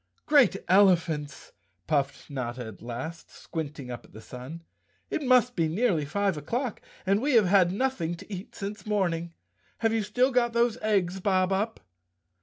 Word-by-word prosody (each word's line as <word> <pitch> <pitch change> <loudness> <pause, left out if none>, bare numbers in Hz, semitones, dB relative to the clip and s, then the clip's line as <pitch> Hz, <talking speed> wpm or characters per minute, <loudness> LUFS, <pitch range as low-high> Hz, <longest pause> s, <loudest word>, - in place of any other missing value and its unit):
"Great 280 -10 +5
Elephants!" 170 -7 +2 0.3
puffed 140 -3 -1
Notta 125 -3 -4
at 110 -3 -10
last, 125 +8 -6
squinting 150 -5 -6
up 120 - -7
at - - -20
the 110 - -10
sun. 130 +9 -9 0.5
"It - - -1
must 250 -2 +4
be 165 -3 +2
nearly 170 -3 +1
five 195 +3 0
o'clock 235 - -3 0.2
and 200 +2 +2
we've 250 -7 +4
had 185 -1 +4
nothing 195 -7 -1
to 200 - -10
eat 190 +2 -8
since 205 0 -6
morning. 170 -5 -1 0.5
Have 225 -1 +2
you 225 - +1
still 245 +6 +1
got 240 -2 +2
those 235 -1 +2
eggs, 190 -4 +1
Bob 185 -1 +2
Up?" 210 +4 -1
190 Hz, 160 wpm, -27 LUFS, 155-225 Hz, 0.5 s, Great